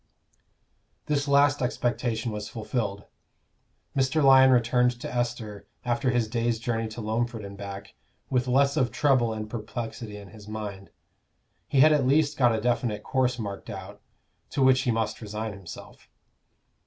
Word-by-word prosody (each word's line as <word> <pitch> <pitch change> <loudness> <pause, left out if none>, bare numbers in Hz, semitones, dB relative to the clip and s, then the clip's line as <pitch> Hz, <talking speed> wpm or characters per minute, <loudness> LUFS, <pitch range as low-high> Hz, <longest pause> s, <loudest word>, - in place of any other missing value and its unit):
This 145 -1 0
last 140 0 +4
expectation 120 -2 -1
was 105 0 -5
fulfilled. 105 -3 -3 0.9
Mr. 135 +3 +2
Lyon 135 -1 +7
returned 125 0 +3
to - - -6
Esther, 115 -4 -3 0.2
after 125 +2 0
his 120 -3 +1
day's 115 0 0
journey 115 0 -2
to 110 +2 -7
Loamford 115 0 -2
and 100 0 -8
back, 100 0 -8 0.3
with 125 -1 0
less 140 +2 +3
of 125 -2 +2
trouble 125 -3 +2
and 110 -1 -4
perplexity 110 -1 -6
in 100 -1 -11
his 105 -2 -14
mind: 105 -3 -6 0.8
he 135 - +3
had 155 +1 +7
at 140 -4 +2
least 145 +2 +3
got 120 -3 +4
a - - -1
definite 115 -2 -1
course 125 -1 0
marked 100 -2 -6
out, 95 -3 -8 0.5
to 140 - 0
which 130 0 +5
he 125 - -1
must 115 0 -2
resign 110 0 -4
himself. 95 -4 -11
120 Hz, 155 wpm, -27 LUFS, 110-130 Hz, 0.9 s, Lyon